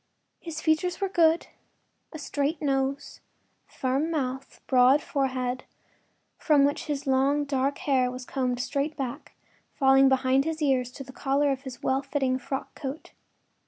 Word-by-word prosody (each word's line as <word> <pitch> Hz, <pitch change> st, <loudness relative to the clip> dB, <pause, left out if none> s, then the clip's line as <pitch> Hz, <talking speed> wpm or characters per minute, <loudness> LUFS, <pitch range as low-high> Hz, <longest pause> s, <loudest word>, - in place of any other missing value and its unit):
His 320 Hz, -2 st, -6 dB
features 345 Hz, +3 st, +1 dB
were 390 Hz, -1 st, -1 dB
good—a 330 Hz, -2 st, -2 dB
straight 290 Hz, +1 st, -2 dB
nose, 275 Hz, 0 st, -1 dB, 0.5 s
firm 270 Hz, +5 st, -1 dB
mouth, 270 Hz, -4 st, -3 dB
broad 255 Hz, +2 st, +5 dB
forehead, 255 Hz, -3 st, -2 dB, 0.8 s
from 290 Hz, -3 st, +4 dB
which 285 Hz, +2 st, -1 dB
his 290 Hz, -2 st, -3 dB
long, 275 Hz, +2 st, +2 dB
dark 275 Hz, 0 st, 0 dB
hair 260 Hz, -3 st, +1 dB
was 250 Hz, 0 st, -7 dB
combed 250 Hz, -2 st, -2 dB
straight 280 Hz, +4 st, -2 dB
back, 260 Hz, -4 st, -5 dB, 0.4 s
falling 270 Hz, 0 st, +5 dB
behind 265 Hz, 0 st, +3 dB
his 320 Hz, +1 st, -3 dB
ears 265 Hz, -5 st, +1 dB
to 275 Hz, -, -8 dB
the 260 Hz, 0 st, -12 dB
collar 280 Hz, +1 st, +1 dB
of 270 Hz, -1 st, -3 dB
his 260 Hz, -2 st, -9 dB
well 265 Hz, +1 st, +1 dB
fitting 270 Hz, -2 st, -1 dB
frock 270 Hz, +1 st, -5 dB
coat. 275 Hz, +2 st, -7 dB
275 Hz, 145 wpm, -27 LUFS, 260-295 Hz, 0.8 s, broad